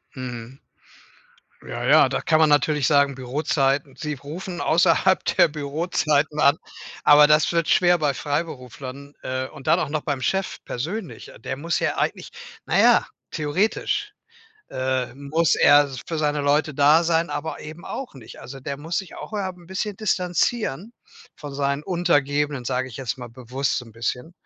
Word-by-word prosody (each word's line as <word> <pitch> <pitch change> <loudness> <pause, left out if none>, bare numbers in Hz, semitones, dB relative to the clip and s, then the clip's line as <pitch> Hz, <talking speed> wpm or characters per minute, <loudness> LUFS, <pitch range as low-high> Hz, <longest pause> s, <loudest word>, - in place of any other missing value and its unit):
Mhm. 125 0 -7 1.1
Ja, - - -5
ja, - - +6
da - - -2
kann 160 -1 +2
man 155 - +5
natürlich 150 -1 +2
sagen, 140 -2 +3
Bürozeiten. 135 +1 -1
Sie 150 +3 -4
rufen 170 +6 -7
außerhalb 175 +3 +3
der - - +4
Bürozeiten 150 0 -1
an. 140 +3 +5 0.5
Aber 150 0 +8
das 150 +2 +3
wird 170 -1 0
schwer 175 -1 +4
bei 150 -3 0
Freiberuflern, 140 -1 -5
äh, 130 0 -3
und 135 - -13
dann 165 +3 +4
auch 155 -5 -2
noch 155 - -1
beim 140 -3 -3
Chef 190 +9 -2
persönlich. 175 - -5
Der 130 - -4
muss 165 +3 -1
ja - - -1
eigentlich - - -2 0.3
na - - 0
ja, - - +5 0.2
theoretisch, 205 - -1 0.6
äh, 130 -1 -2
muss 145 +4 +1
er 145 0 +6 0.2
für 165 - -3
seine 150 -1 0
Leute 145 +1 +1
da 150 +4 +5
sein, 165 0 +1
aber 160 +2 -4
eben 155 +3 -10
auch 270 - -6
nicht. 125 -5 -12
Also, 135 +2 -10
der 140 +2 -5
muss 160 +4 -3
sich 195 - -7
auch, - - -9
äh, - - -3
'n 180 -2 -11
bisschen 195 +2 -4
distanzieren 195 - -1 0.4
von 145 -2 -9
seinen 140 +1 -1
Untergebenen, 145 -6 0
sage 130 +1 -1
ich 115 - -10
jetzt 130 -2 -4
mal 120 - -7
bewusst 130 +3 -3
so 125 - -7
'n 115 - -15
bisschen, 125 +7 -4
145 Hz, 165 wpm, -23 LUFS, 135-165 Hz, 1.1 s, Aber